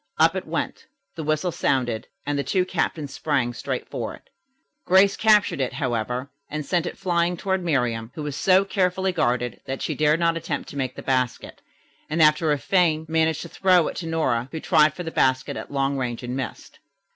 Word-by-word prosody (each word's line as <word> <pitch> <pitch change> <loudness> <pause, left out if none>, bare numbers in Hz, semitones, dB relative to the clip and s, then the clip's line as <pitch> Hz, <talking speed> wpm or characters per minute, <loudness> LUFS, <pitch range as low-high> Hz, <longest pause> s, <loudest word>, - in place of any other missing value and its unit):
Up - - +4
it - - -4
went, - - -3 0.3
the 160 - -5
whistle 155 +4 0
sounded 125 -8 0 0.2
and 145 0 -1
the 140 - 0
two 185 +3 +1
captains 160 -5 -2
sprang 135 -6 0
straight - - -4
for - - -4
it. - - -23 0.5
Grace 190 +2 +5
captured 210 -9 +3
it, 130 - -1
however, 125 0 -2 0.2
and 150 0 -4
sent 175 0 0
it - - -6
flying 175 -2 0
toward 190 0 -1
Miriam, 125 -8 0
who 155 - -5
was 145 -2 -4
so 190 +5 +4
carefully 190 -1 0
guarded 125 -8 -1
that 135 0 -4
she 155 - -1
dared 150 +2 +2
not 165 -1 +2
attempt 150 -3 -4
to - - -10
make 130 -2 -2
the - - -8
basket, 130 -2 -1 0.5
and 155 +2 -1
after 155 0 +4
a 145 - +2
feint 160 +2 +1
managed 160 -1 +1
to - - -9
throw 185 -3 +3
it - - -8
to 165 - -4
Nora, 130 -7 0
who 160 - -4
tried 155 -1 +4
for 180 - -5
the 165 - -5
basket 130 -3 +1
at - - -7
long 140 0 0
range 120 -1 -3
and 125 +1 -4
missed. 130 -4 -6
155 Hz, 205 wpm, -24 LUFS, 130-175 Hz, 0.5 s, Grace